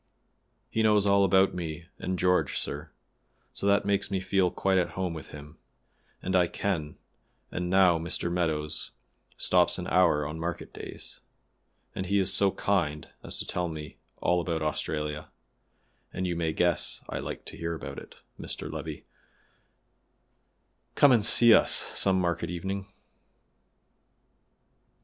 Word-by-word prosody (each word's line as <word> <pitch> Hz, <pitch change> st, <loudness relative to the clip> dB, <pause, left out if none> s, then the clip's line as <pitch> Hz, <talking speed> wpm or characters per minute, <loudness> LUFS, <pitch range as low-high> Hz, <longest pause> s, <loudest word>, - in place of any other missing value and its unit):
He 110 Hz, -, 0 dB
knows 105 Hz, -2 st, +4 dB
all 100 Hz, 0 st, +4 dB
about 95 Hz, 0 st, +4 dB
me 85 Hz, -1 st, -5 dB
and 95 Hz, 0 st, -2 dB
George, 90 Hz, +1 st, +2 dB
sir; 75 Hz, +2 st, -4 dB, 0.6 s
so 100 Hz, -, -2 dB
that 100 Hz, 0 st, +3 dB
makes 100 Hz, -1 st, +1 dB
me 95 Hz, -1 st, -1 dB
feel 95 Hz, -1 st, +1 dB
quite 95 Hz, +1 st, +1 dB
at 90 Hz, -, -1 dB
home 90 Hz, -2 st, -1 dB
with 80 Hz, -, -8 dB
him, 75 Hz, +1 st, -12 dB, 0.6 s
and 95 Hz, +1 st, -1 dB
I 90 Hz, -1 st, +4 dB
can 80 Hz, -6 st, -3 dB, 0.5 s
and 90 Hz, 0 st, -3 dB
now 90 Hz, -3 st, +5 dB
Mr. 85 Hz, +1 st, -2 dB
Meadows 80 Hz, -3 st, -1 dB, 0.5 s
stops -, -, +3 dB
an -, -, -5 dB
hour 85 Hz, -5 st, +3 dB
on 75 Hz, +2 st, -5 dB
market 85 Hz, +1 st, -5 dB
days, -, -, -9 dB, 0.7 s
and 95 Hz, -, -4 dB
he 100 Hz, +2 st, +2 dB
is 95 Hz, -2 st, +2 dB
so 100 Hz, -, +4 dB
kind 85 Hz, -7 st, -1 dB
as -, -, -3 dB
to -, -, 0 dB
tell 90 Hz, 0 st, -2 dB
me 75 Hz, -2 st, -8 dB, 0.2 s
all 90 Hz, 0 st, +1 dB
about 80 Hz, -2 st, -2 dB
Australia, 75 Hz, 0 st, -3 dB, 0.8 s
and 95 Hz, -, -3 dB
you 90 Hz, -1 st, -1 dB
may 85 Hz, -1 st, 0 dB
guess 85 Hz, +1 st, 0 dB
I -, -, -4 dB
like -, -, -6 dB
to -, -, -7 dB
hear 85 Hz, 0 st, -3 dB
about -, -, -9 dB, 0.2 s
Mr. -, -, -5 dB
Levi, -, -, -6 dB, 1.9 s
come 145 Hz, -, +6 dB
and 115 Hz, -4 st, +4 dB
see 115 Hz, +1 st, +7 dB
us -, -, +4 dB
some 95 Hz, -1 st, +2 dB
market 85 Hz, -2 st, -1 dB
evening. 95 Hz, +3 st, -4 dB
90 Hz, 145 wpm, -28 LUFS, 80-95 Hz, 1.9 s, see